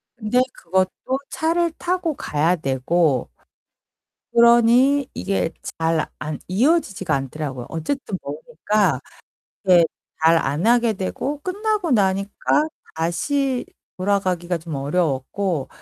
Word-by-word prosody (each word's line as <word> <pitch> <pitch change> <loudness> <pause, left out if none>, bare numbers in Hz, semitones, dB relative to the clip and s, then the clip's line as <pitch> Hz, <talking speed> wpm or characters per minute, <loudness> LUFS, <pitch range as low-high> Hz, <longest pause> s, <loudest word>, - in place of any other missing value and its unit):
근데 240 +2 0
그것도 185 +2 0 0.4
차를 335 +2 +1
타고 350 -4 -1
가야 160 +4 +1
되고 135 - +1 1.0
그러니 240 +4 +5
이게 195 -4 -1 0.3
잘 165 -1 +1
안 155 -1 -5
이어지지가 205 - +1
않더라고요. 135 -2 -4
어쨌든 190 - -3
머니까 175 - 0 0.7
이게 180 -3 +6 0.4
잘 165 +1 +5
안 155 +5 0
하게 235 -2 +4
되고 265 +9 -3
끝나고 400 -3 -1
나니까 200 +8 +1 0.3
다시 250 - 0 0.3
돌아가기가 185 -3 0
좀 160 -2 -7
어려웠고 150 +2 -1
190 Hz, 235 characters per minute, -22 LUFS, 160-245 Hz, 1.0 s, 이게